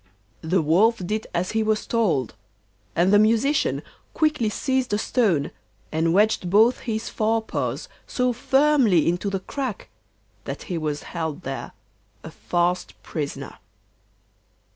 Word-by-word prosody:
The 170 +2 +1
Wolf 200 +10 +4
did 215 +4 -2
as 175 +1 -1
he 220 - +1
was 215 0 0
told, 175 - 0 0.6
and 180 +4 +3
the 205 - +7
Musician 230 +7 +2 0.3
quickly 300 -8 +2
seized 260 +1 -1
a - - +3
stone, 195 - +1 0.4
and 160 +1 +1
wedged 200 -1 +2
both 220 +6 +4
his 220 0 -2
fore 225 +1 0
paws - - -3 0.2
so 250 -1 0
firmly 265 - +3
into 175 +4 0
the 195 -1 -2
crack 255 0 -5 0.6
that - - -5
he 180 - -4
was 150 -2 -3
held 165 0 -4
there, 135 0 -5 0.5
a 160 - -8
fast 175 +2 -1
prisoner. 145 -3 -5
205 Hz, 135 wpm, -24 LUFS, 170-230 Hz, 0.6 s, the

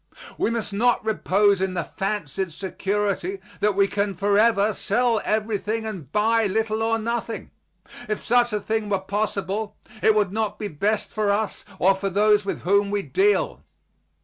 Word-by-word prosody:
We - - 0
must 225 -3 -2
not 235 +3 +2
repose 205 -2 +2
in 190 -1 -1
the 170 - -1
fancied 190 -3 -3
security 195 +1 -2 0.2
that 210 -1 +2
we 200 0 +4
can 200 -1 -1
forever 205 +2 +3
sell 230 +3 +1
everything 220 +1 -1
and 180 - -7
buy 220 +1 +2
little 220 +2 -1
or 225 0 +1
nothing. 230 0 -4 0.6
If 215 - -1
such 240 0 +3
a 210 - 0
thing 220 0 -2
were 200 - +2
possible 205 +1 -2 0.3
it 220 - +4
would 205 -3 +2
not 215 0 -2
be 210 - -4
best 200 +7 -1
for 215 -1 0
us 205 +1 -1
or 190 +2 +4
for 195 +1 -3
those 210 +1 +3
with 200 - -3
whom 200 +2 +2
we 205 0 -1
deal. 405 - +1
210 Hz, 165 wpm, -24 LUFS, 195-220 Hz, 0.6 s, we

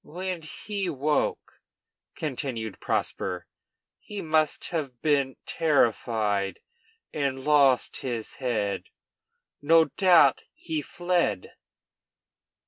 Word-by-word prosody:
"When 180 +1 -4
he 195 +4 -4
woke," 150 0 -1 0.5
continued 125 -7 -4
Prosper, 90 -2 -2 0.5
"he 205 - -7
must 155 -1 +1
have 140 -8 -4
been 140 -3 +2
terrified 110 -9 +1 0.5
and 135 -3 -2
lost 140 -4 +4
his 120 -4 -5
head; 105 -6 -1 0.8
no 165 +2 +5
doubt 175 -9 +5
he 160 -2 -3
fled." 175 - -1
145 Hz, 85 wpm, -27 LUFS, 120-160 Hz, 0.8 s, no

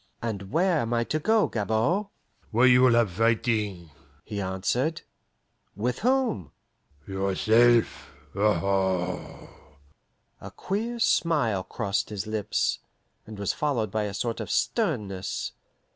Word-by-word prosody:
"And 100 -4 -5
where 175 -1 +2
am 120 -1 -1
I 115 - +2
to 155 +6 -2
go, 220 +6 +3
Gabord?" 115 - 0 0.4
"Where 120 +3 +3
you 125 0 +6
will 125 -2 +5
have 115 -5 +3
fighting," 105 -4 0 0.3
he 105 -1 -4
answered. 120 - -1 0.7
"With 120 +5 -2
whom?" 245 - +1 0.6
"Yourself, 110 +5 +2 0.3
aho!" 95 -3 0 0.9
A - - -8
queer 225 +5 -3
smile 150 - +2
crossed 100 -2 -2
his 105 -1 -4
lips, 110 -2 -1 0.5
and 110 -1 -9
was 100 -1 -1
followed 120 -9 -1
by 110 0 -1
a 100 -1 -5
sort 115 +3 -2
of - - -5
sternness. 105 - -1
110 Hz, 120 wpm, -26 LUFS, 100-135 Hz, 0.9 s, you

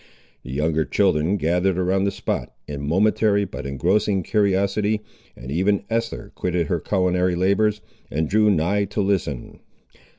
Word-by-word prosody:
The - - -12
younger 80 +3 +1
children 80 +6 +1
gathered 90 +2 +1
around 95 +2 +1
the - - +2
spot, - - -3 0.2
in 70 -1 -5
momentary 100 +3 +2
but 80 - -7
engrossing 95 +8 +1
curiosity, 100 +1 +1 0.3
and 65 +2 -9
even 95 +6 +1
Esther 115 -2 -2
quitted 90 -2 -1
her 85 -1 -1
culinary 90 0 +1
labours, 100 +4 +2 0.3
and 80 +2 -1
drew 105 +1 +3
nigh 100 +3 +1
to 105 +2 -2
listen. 95 -10 -2
95 Hz, 140 wpm, -22 LUFS, 85-100 Hz, 0.3 s, drew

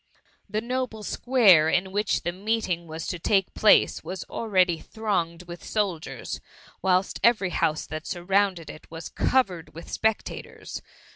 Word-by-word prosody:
The 215 +1 -1
noble 245 -2 -3
square 205 -12 +5
in 190 +3 +1
which 205 +1 0
the 175 - -1
meeting 190 -3 -2
was 160 0 -6
to 180 - -4
take 195 +2 +1
place, 215 - +4
was 190 - -5
already 185 -6 +1
thronged 180 -6 -2
with 175 -2 -10
sol 200 -6 -1
diers; 160 - -6 0.4
whilst 185 0 +1
every 215 -6 +4
house 155 -2 0
that 155 +1 -6
surrounded 185 -1 0
it 155 - -11
was 165 0 -7
covered 190 -13 0
with 165 - -9
spectators. 220 -1 -3
190 Hz, 145 wpm, -26 LUFS, 170-215 Hz, 0.4 s, square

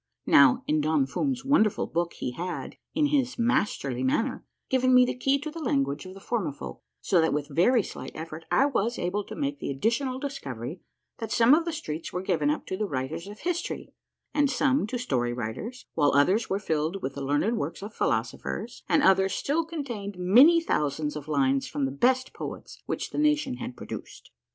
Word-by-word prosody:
Now, 140 -3 +6
in 155 0 +1
Don 150 -2 +2
Fum's 265 - -2
wonderful 245 -7 +3
book 170 +1 -2
he - - -4
had, 175 +7 -5 0.2
in 305 -1 +3
his 275 -3 +1
masterly 210 - 0
manner, 225 - 0 0.2
given 255 0 +3
me 250 0 +7
the - - -1
key 270 +2 +2
to 300 +2 -6
the 330 +1 -7
language 140 - 0
of 185 - -10
the - - -10
Formifolk, 170 - -4 0.2
so 165 - +3
that 160 - +2
with 145 0 -2
very 230 +6 +4
slight - - -7
effort 160 0 -7
I 275 - +4
was 240 -4 0
able 190 +4 -1
to - - -8
make 285 -1 -2
the - - -4
additional 235 - 0
discovery 155 - -6 0.4
that 225 -2 -5
some 235 +3 +5
of 330 +2 +4
the 335 - -1
streets 160 - -5
were 180 +1 -3
given 160 -6 +1
up 150 - -1
to 185 - -4
the 210 0 -1
writers 145 +5 -4
of 205 +1 -10
histoiy, 350 -1 -3 0.4
and 290 -1 +3
some 265 -3 +2
to 250 - -3
story 125 - -1
writers, 125 - -5
while 145 -3 +3
others 185 +11 +3
were 195 - +1
filled 165 -1 -2
with 135 - -2
the 140 - -6
learned 145 - +1
works 195 - -4
of 210 +2 -7
philosophers, 110 - -2
and - - +4
others 190 0 +4
still 315 +4 0
contained 240 - -5
many 250 - +7
thousands 150 - -1
oi 150 -2 -6
lines 135 -2 +2
from 140 - -1
the 135 - -2
best 255 - +1
poets - - -8
which - - -3
the - - -3
nation 300 - +2
had 125 0 -6
produced. - - -9
195 Hz, 200 wpm, -27 LUFS, -, 0.4 s, me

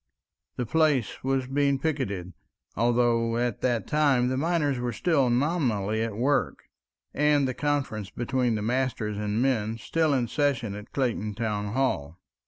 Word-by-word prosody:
The 125 - -2
place 145 -4 +1
was 135 -1 0
being 140 +1 +1
picketed, 125 - -2 0.4
although 115 0 +2
at 120 -2 -1
that 120 -3 0
time 140 -5 +2
the 130 - -1
miners 145 -2 0
were 120 -1 -2
still 140 -1 +2
nominally 120 - 0
at 115 -2 -3
work, 140 +5 0 0.5
and 145 -2 +3
the 130 - -2
conferences 135 -9 -2
between 120 +1 0
masters 120 -4 -1
and 105 +3 0
men 115 -4 0
still 155 +5 +1
in 120 -3 0
session 135 -7 0
at 105 +2 -9
Clayton 115 -6 -1
Town 105 -2 -2
Hall. 85 - -1
125 Hz, 145 wpm, -27 LUFS, 110-140 Hz, 0.5 s, and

